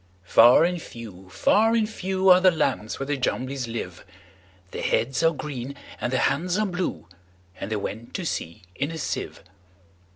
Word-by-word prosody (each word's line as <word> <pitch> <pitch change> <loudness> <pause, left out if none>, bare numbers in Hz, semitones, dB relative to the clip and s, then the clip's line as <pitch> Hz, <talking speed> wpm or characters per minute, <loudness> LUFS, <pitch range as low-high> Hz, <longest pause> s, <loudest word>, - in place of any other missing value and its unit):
Far 120 - +7
and 175 0 0
few, 100 -8 -11
far 225 - +3
and 220 -2 +2
few, 190 -2 0
Are 180 0 +8
the 185 - +7
lands 135 -10 -1
where 135 - -2
the 145 0 -1
Jumblies 130 0 -2
live:Their 95 -5 -9
heads 130 +4 0
are 165 - +5
green, 140 -4 -6 0.2
and 120 - -2
their 130 - +1
hands 175 +6 +1
are 215 - +1
blue; 180 - -3 0.5
And 95 - -5
they - - +1
went 110 +3 -5
to 185 - -3
sea 85 - -4
in 140 +9 -2
a 165 - -6
sieve. 150 - -4
135 Hz, 170 wpm, -25 LUFS, 115-180 Hz, 0.5 s, Are